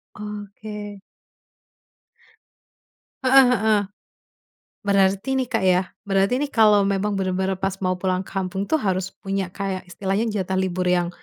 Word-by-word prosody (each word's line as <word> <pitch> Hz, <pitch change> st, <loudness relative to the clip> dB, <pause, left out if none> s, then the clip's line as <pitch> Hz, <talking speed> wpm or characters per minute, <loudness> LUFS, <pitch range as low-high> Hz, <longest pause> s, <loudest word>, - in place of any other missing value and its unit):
Oke. 210 Hz, 0 st, -8 dB, 2.2 s
Heeh 265 Hz, +1 st, +7 dB
heeh. 215 Hz, -2 st, +3 dB, 1.0 s
Berarti 200 Hz, +4 st, +2 dB
ni 260 Hz, -, +1 dB
Kak 225 Hz, -5 st, 0 dB
yah, 185 Hz, 0 st, +4 dB, 0.2 s
berarti 195 Hz, +5 st, +2 dB
ini 290 Hz, -, -1 dB
kalau 210 Hz, -3 st, +5 dB
memang 200 Hz, +1 st, 0 dB
bener-bener 190 Hz, 0 st, -1 dB
pas 195 Hz, 0 st, -1 dB
mau 185 Hz, 0 st, +1 dB
pulang 185 Hz, 0 st, -1 dB
kampung 195 Hz, 0 st, -4 dB
tu 315 Hz, -, +3 dB
harus 190 Hz, -6 st, -1 dB, 0.2 s
punya 195 Hz, -1 st, -1 dB
kayak 190 Hz, 0 st, -4 dB
istilahnya 195 Hz, +5 st, -1 dB
jatah 190 Hz, -3 st, -2 dB
libur 185 Hz, -1 st, -1 dB
yang 175 Hz, -1 st, +2 dB
195 Hz, 130 wpm, -23 LUFS, 190-210 Hz, 2.2 s, Heeh